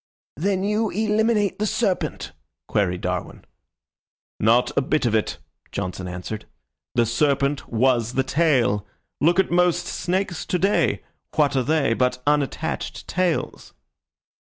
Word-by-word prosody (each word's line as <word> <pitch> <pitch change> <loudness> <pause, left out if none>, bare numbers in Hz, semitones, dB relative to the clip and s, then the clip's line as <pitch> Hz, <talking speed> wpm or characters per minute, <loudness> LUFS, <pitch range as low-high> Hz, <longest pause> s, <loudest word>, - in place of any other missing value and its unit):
"Then 190 +5 0
you 210 +2 +1
eliminate 215 0 +1
the 215 - +1
serpent?" 215 -3 -1 0.4
queried 90 -3 0
Darwin. 90 -1 -4 0.9
"Not 115 +3 +3
a - - +3
bit 145 +1 0
of 115 - +1
it," 110 -1 0 0.3
Johnson 95 -1 -4
answered. 90 +4 -6 0.5
"The 120 -1 +4
serpent 140 +3 +1
was 120 0 +2
the 130 - +2
tail. 130 -9 +2 0.3
Look 170 +5 +3
at 190 - +2
most 180 0 +3
snakes 185 -1 -2
to 180 - +1
day. 195 +3 +1 0.3
What 145 -2 +3
are 130 - +3
they 150 -3 +2
but 125 +2 +1
unattached 150 +2 -1
tails?" 180 -2 -2
145 Hz, 125 wpm, -23 LUFS, 115-185 Hz, 0.9 s, The